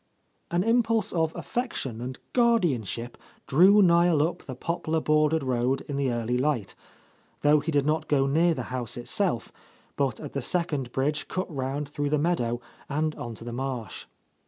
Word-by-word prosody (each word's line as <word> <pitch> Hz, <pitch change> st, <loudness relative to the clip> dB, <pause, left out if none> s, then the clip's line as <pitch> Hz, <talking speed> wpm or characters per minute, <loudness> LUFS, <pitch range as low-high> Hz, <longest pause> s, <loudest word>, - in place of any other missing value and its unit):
An 175 Hz, +1 st, +1 dB
impulse 230 Hz, -2 st, +2 dB
of 160 Hz, -2 st, +1 dB
affection 135 Hz, -, -3 dB
and 130 Hz, +1 st, -5 dB, 0.2 s
guardianship 145 Hz, -, +1 dB, 0.3 s
drew 195 Hz, +8 st, +6 dB
Niel 170 Hz, -3 st, +4 dB
up 175 Hz, +2 st, -2 dB
the 130 Hz, -, -8 dB
poplar 160 Hz, +2 st, -1 dB
bordered 155 Hz, 0 st, +2 dB
road 130 Hz, +1 st, 0 dB
in 145 Hz, -, -6 dB
the 140 Hz, -2 st, 0 dB
early 120 Hz, +1 st, -1 dB
light, 130 Hz, -8 st, 0 dB, 0.4 s
— -, -, -35 dB
^though 150 Hz, 0 st, +5 dB
he 160 Hz, -, -1 dB
did 145 Hz, -2 st, +2 dB
not 155 Hz, +1 st, 0 dB
go 135 Hz, -2 st, +3 dB
near 165 Hz, +4 st, +3 dB
the -, -, -3 dB
house 125 Hz, -3 st, -4 dB
it 120 Hz, -, -7 dB
self, 190 Hz, -, 0 dB, 0.4 s
but 135 Hz, -5 st, 0 dB
at 150 Hz, -, -8 dB
the 140 Hz, -, -2 dB
second 145 Hz, -5 st, -1 dB
bridge 145 Hz, +4 st, -1 dB
cut 185 Hz, -4 st, -4 dB
round 135 Hz, +2 st, -2 dB
through 145 Hz, 0 st, -2 dB
the 150 Hz, -, +2 dB
meadow 135 Hz, -7 st, 0 dB, 0.3 s
and 155 Hz, +2 st, 0 dB
on 120 Hz, -5 st, -7 dB
to 115 Hz, -, -10 dB
the 120 Hz, 0 st, -6 dB
marsh. 125 Hz, -4 st, -4 dB
145 Hz, 180 wpm, -27 LUFS, 130-170 Hz, 0.4 s, drew